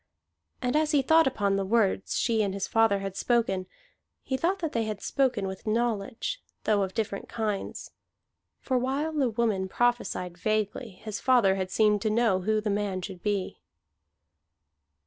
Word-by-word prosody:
And 250 +3 0
as 305 0 +2
he 280 -2 +4
thought 320 +2 +5
upon 200 -6 +1
the 195 - 0
words 200 -1 +1
she 225 -2 +2
and 200 -2 -1
his 200 - -2
father 225 -3 +3
had 195 -1 -5
spoken, 195 -7 +1 0.6
he 265 - -2
thought 345 +8 +1
that 325 -5 -3
they 230 -1 0
had 215 -2 -4
spoken 250 -7 0
with 190 +2 -6
knowledge, 230 - -1 0.2
though 210 -2 +2
of 190 -1 -2
different 210 -3 -3
kinds: 215 -4 -3 0.7
for 255 -2 0
while 275 +5 -1
the 280 -5 +1
woman 215 -5 0
prophesied 195 -7 -1
vaguely, 215 +4 -1
his 210 +2 -7
father 245 -7 +4
had 190 -1 -2
seemed 210 +1 +3
to 215 - +1
know 215 -4 +2
who 215 +3 +1
the 210 -1 -1
man 200 -2 -1
should 185 -2 -7
be. 205 -3 -2
215 Hz, 165 wpm, -28 LUFS, 195-245 Hz, 0.7 s, thought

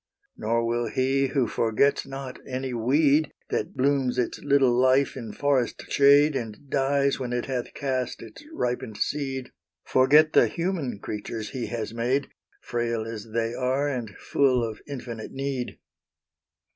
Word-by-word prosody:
Nor 115 +2 0
will 120 0 0
He 135 +3 +1
who 130 -2 +1
forgets 115 +7 +1
not 135 -1 -7
any 130 0 -3
weed 140 +5 +3 0.2
That - - -2
blooms 130 -2 +1
its 125 - -1
little 140 -3 +4
life 130 +2 +3
in 115 -5 -6
forest 140 -3 0
shade, 145 +1 +6
And 115 +2 -6
dies 140 0 +2
when 125 -2 -3
it 120 -1 -1
hath 125 -3 -4
cast 130 -3 -2
its - - -12
ripened 120 - -3
seed, 135 -3 -2 0.3
Forget 150 +4 +5
the - - +6
human 165 - -2
creatures 105 +1 -5
He 125 -3 -3
has 115 -2 -4
made, 125 +4 0 0.3
Frail 115 -2 -2
as 115 -1 -7
they 115 +1 -1
are, 130 +3 0
and 125 -6 -3
full 130 -3 +2
of 110 - -8
infinite 120 -5 -7
need. 135 -2 -3
130 Hz, 145 wpm, -26 LUFS, 115-140 Hz, 0.3 s, shade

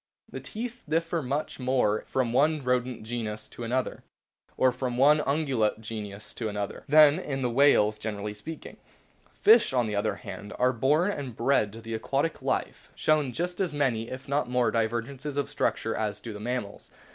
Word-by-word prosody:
The - - -5
teeth 240 +2 -6
differ 165 +1 0
much 140 +3 -3
more 125 -5 +2
in - - -15
form - - -29 0.2
from - - -4
one 150 +3 +3
Rodent 125 -2 0
genus 110 -2 -4
to 120 - -8
another, 125 +2 -2 0.6
or 130 - +4
from 125 -1 -3
one 145 +4 +6
Ungulate 135 -8 +1
genus 105 -2 -7
to 110 -2 -3
another, 105 -1 -4
than 150 +1 +7
in 135 -6 -3
the 125 - 0
whales, 115 -5 +4
generally 105 -1 -4
speaking. 155 +10 -9 0.5
Fishes, 435 - +5
on 125 -2 +2
the 105 -1 -2
other 105 0 0
hand, 100 +2 -8
which - - -12
are 125 +1 +3
born 150 - +2
and 135 - -5
bred 115 -4 +2
to 115 - -9
the 115 0 -6
aquatic 140 +8 -1
life, - - -2
show 155 -3 +2
just 175 +8 -3
as 170 -6 -1
many 120 -5 0
(if 130 +1 -7
not 140 -2 0
more) 125 -1 +2
divergences 120 +5 -2
of 145 - -1
structure 115 - 0
as 105 -2 -2
do 115 - -7
the 105 - -8
mammals. 115 -2 -4
125 Hz, 190 wpm, -28 LUFS, 110-145 Hz, 0.6 s, than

